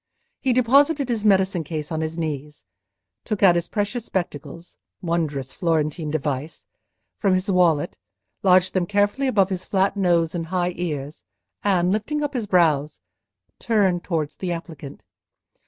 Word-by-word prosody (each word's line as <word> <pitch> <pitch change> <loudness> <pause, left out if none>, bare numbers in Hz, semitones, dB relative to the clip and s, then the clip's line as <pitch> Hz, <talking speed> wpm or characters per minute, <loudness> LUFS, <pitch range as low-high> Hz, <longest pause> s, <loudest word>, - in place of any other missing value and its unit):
He 265 - 0
deposited 275 +3 +3
his 225 -3 -1
medicine 190 -4 +3
case 155 0 -5
on 160 0 -2
his 160 +1 -4
knees, 150 -2 -5 0.6
took 215 -3 -3
out 185 -3 +8
his 170 -1 -1
precious 210 +3 -2
spectacles 170 -3 -5 0.2
(wondrous 160 -7 -2
Florentine 160 -2 -1
device!) 145 0 -3 0.5
from 195 -3 +2
his 185 +2 -1
wallet, 175 -3 +2 0.4
lodged 185 -1 +4
them 180 -2 0
carefully 205 +7 +1
above 200 -6 +2
his 185 -1 -3
flat 195 0 +1
nose 170 -4 +2
and 165 -2 -3
high 180 0 -1
ears, 150 - -5 0.4
and 185 -3 +2
lifting 295 +9 -1
up 290 0 -2
his 235 -5 -3
brows, 155 - +2 0.6
turned 195 -6 +1
towards 160 -4 -2
the 185 -2 -3
applicant. 160 -4 -7
180 Hz, 145 wpm, -23 LUFS, 160-205 Hz, 0.6 s, out